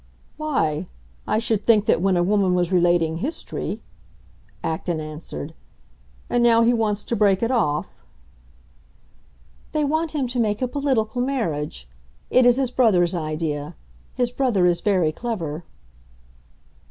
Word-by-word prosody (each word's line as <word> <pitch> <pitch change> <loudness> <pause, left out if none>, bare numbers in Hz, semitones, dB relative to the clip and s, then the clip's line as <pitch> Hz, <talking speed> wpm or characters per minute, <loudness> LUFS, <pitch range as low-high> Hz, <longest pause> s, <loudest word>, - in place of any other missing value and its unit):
"Why, 180 - -1 0.4
I - - +1
should 220 -2 0
think 215 -3 +4
that 165 - +2
when 190 -1 +2
a 175 - +3
woman 190 -1 +2
was 175 0 0
relating 175 -3 +2
history 285 - -4 0.4
" - - -31
Acton 160 0 -3
answered. 155 0 -7 0.7
"And 245 - +1
now 230 -1 +5
he 235 +1 +4
wants 215 -3 0
to 235 - -1
break 200 -1 +3
it 230 - +1
off?" 150 - -1 1.7
"They 305 - +1
want 315 +2 0
him 285 -4 0
to 245 0 -2
make 210 -2 +1
a 255 - 0
political 250 -4 -1
marriage. 155 - -2 0.4
It 255 -1 +5
is 245 - +6
his 265 -2 0
brother's 195 -9 +3
idea. 155 -2 -3 0.4
His 245 -1 0
brother 245 -9 +1
is 175 -1 +2
very 185 -6 +2
clever." 170 -6 -4
205 Hz, 140 wpm, -23 LUFS, 170-245 Hz, 1.7 s, is